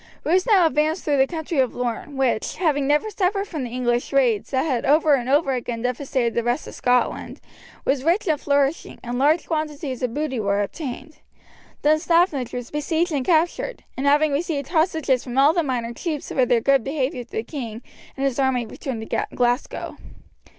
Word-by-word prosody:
Bruce 365 +5 +2
now 395 -6 +5
advanced 310 +2 +1
through 290 -2 +2
the 265 0 +4
country 320 -1 -3
of 255 -3 +1
Lorne, 250 +3 -4
which, 260 -5 0
having 290 -6 +1
never 300 +9 +2
suffered 395 +1 0
from 310 -8 -4
the 245 - -4
English 240 0 -1
raids 250 -7 +2
that 260 -1 +1
had 255 -7 0
over 305 +1 +4
and 255 -2 0
over 280 -1 +3
again 240 -2 -4
devastated 250 -1 -1
the 235 - +1
rest 240 +5 -1
of - - -9
Scotland, 250 0 0 0.5
was 270 -1 +1
rich 350 +8 +1
and 310 -3 +1
flourishing, 285 +1 0
and 245 0 -3
large 305 +5 +3
quantities 300 -4 -3
of 245 -2 -2
booty 295 -5 -2
were 200 -1 +1
obtained. 285 +5 -7 0.7
Dunstaffnage 310 -3 +2
was 245 -1 -6
besieged 320 +3 0
and 280 -4 0
captured, 345 - 0
and 270 +2 -1
having 295 +1 +4
received 285 -2 -2
hostages 315 -6 +1
from 250 0 -6
all 280 +3 +6
the 345 - +2
minor 245 -5 -2
chiefs 300 +3 -4
for 255 -2 +1
their 240 -2 +3
good 275 0 +3
behaviour 270 -2 -2
the 225 -2 -5
king 235 -4 -6 0.3
and 270 - -1
his 270 -1 -1
army 260 -3 +1
returned 230 -2 -6
to - - -1
Glasgow. 245 +1 -1
275 Hz, 185 wpm, -23 LUFS, 250-310 Hz, 0.7 s, all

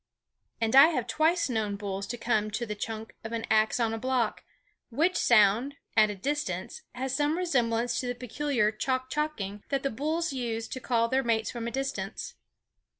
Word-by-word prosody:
And 225 +1 +1
I 275 +3 +10
have 280 -9 -1
twice 315 +8 +2
known 220 -5 -1
bulls 200 -1 -4
to 240 - -4
come 220 -3 0
to 220 +3 -3
the 210 - -4
chuck 220 +1 -6
of 225 +1 -6
an 225 -1 -2
ax 220 +2 +3
on 225 -1 +1
a 225 - -3
block; 255 -2 0 0.5
which 320 +9 +1
sound, 235 +5 +4 0.2
at 215 -1 +6
a 210 - -4
distance, 295 - -3
has 260 +1 -3
some 295 +3 +1
resemblance 240 -8 +1
to 250 - -3
the 245 - -2
peculiar 250 -2 0
chock 255 +4 -2
chocking 210 -10 -3
that 275 -1 -1
the 275 - 0
bulls 310 +6 -1
use 230 -3 -3
to 260 - -5
call 230 -3 +1
their 260 +3 +2
mates 225 -3 0
from 235 -1 -4
a - - -3
distance. 245 -7 -4
240 Hz, 190 wpm, -28 LUFS, 220-270 Hz, 0.5 s, I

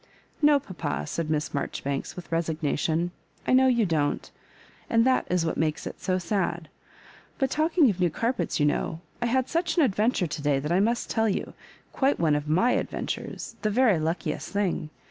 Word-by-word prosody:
No, 295 -1 +6
papa," 120 - -4
said 160 - -3
Miss 150 -1 -1
Marjoribanks, 140 -1 -3
with 180 - -9
resignation. 165 +1 0 0.3
"I - - +2
know 260 +1 +6
you 240 -4 +3
don't, 155 -5 -1 0.6
and 230 0 +4
that 260 0 +2
is 180 -2 +1
what 160 - -1
makes 155 -1 -1
it - - -7
so 185 -1 +1
sad. 175 -3 -2 0.7
But 270 -2 0
talking 315 0 +3
of 190 - -7
new 180 -1 +3
car 230 +9 0
pets, - - -2
you 150 - +3
know, 160 +2 -1 0.2
I 240 - +1
had 260 +2 +1
such 335 +1 -1
an 330 - +6
adventure 215 -3 +2
to 150 -2 -5
day 145 -1 +2
that 150 +4 -3
I 180 - +3
must 230 +4 0
tell 225 -1 +2
you 195 - -2 0.2
— - - -30
quite 275 +1 +2
oneof 150 -3 +1
tm^ 180 +11 +3
adventures - - -5
— - - -31
^the 215 - +1
very 215 -5 +3
luckiest 160 +3 -2
thing. 195 -6 -1
180 Hz, 195 wpm, -26 LUFS, 155-240 Hz, 0.7 s, No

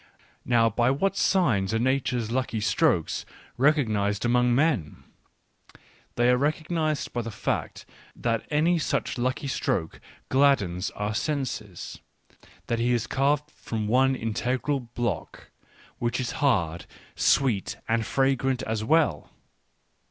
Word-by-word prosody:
Now, 115 -2 +4
by 120 +3 +2
what 195 +9 +1
signs 115 - +2
are - - +3
Nature's 125 -2 0
lucky 125 -3 -1
strokes 105 -3 +1 0.3
recognised 110 -8 +1
among 125 0 +3
men? 135 - 0 1.1
They 120 0 +3
are 125 - +4
recognised 155 +2 -1
by 120 - -1
the 115 - -5
fact 105 - -3 0.3
that 115 -2 -1
any 165 +3 +2
such 140 - -1
lucky 130 +4 -1
stroke 130 - -2 0.3
gladdens 105 -10 +2
our 105 +1 -2
senses; 115 - -4 0.7
that 115 - -1
he 120 +1 +2
is 120 -2 0
carved 145 +2 0
from 110 -7 -4
one 130 +4 +3
integral 125 +5 -1
block, 120 -6 -5 0.5
which 120 +1 -1
is 125 - -2
hard, 85 - +1 0.3
sweet, 120 -8 +2
and 115 0 +1
fragrant 135 +1 +1
as 110 -1 -2
well. 120 - +2
125 Hz, 120 wpm, -26 LUFS, 110-140 Hz, 1.1 s, Now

